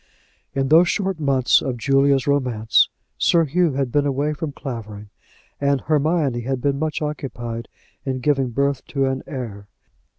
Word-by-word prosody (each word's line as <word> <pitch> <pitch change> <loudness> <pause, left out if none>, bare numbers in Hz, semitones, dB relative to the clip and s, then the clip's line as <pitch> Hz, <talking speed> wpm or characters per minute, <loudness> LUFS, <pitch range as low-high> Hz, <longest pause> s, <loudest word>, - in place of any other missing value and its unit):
In 135 -1 0
those 170 +3 +6
short 190 -4 -1
months 135 -4 +3
of 130 -3 -3
Julia's 135 +1 +3
romance 125 -6 +2 0.3
Sir 165 -1 +4
Hugh 165 +1 +1
had 135 -2 -1
been 145 +1 +2
away 140 +2 0
from 150 0 -4
Clavering, 110 -7 -7 0.5
and 140 -2 +1
Hermione 150 -4 +1
had 130 +2 -2
been 140 +1 0
much 155 0 -2
occupied 120 -6 -5 0.4
in 130 -1 -2
giving 135 -1 +1
birth 140 +2 0
to 135 -2 -1
an 130 0 -1
heir. 110 -7 -6
135 Hz, 155 wpm, -22 LUFS, 125-150 Hz, 0.5 s, those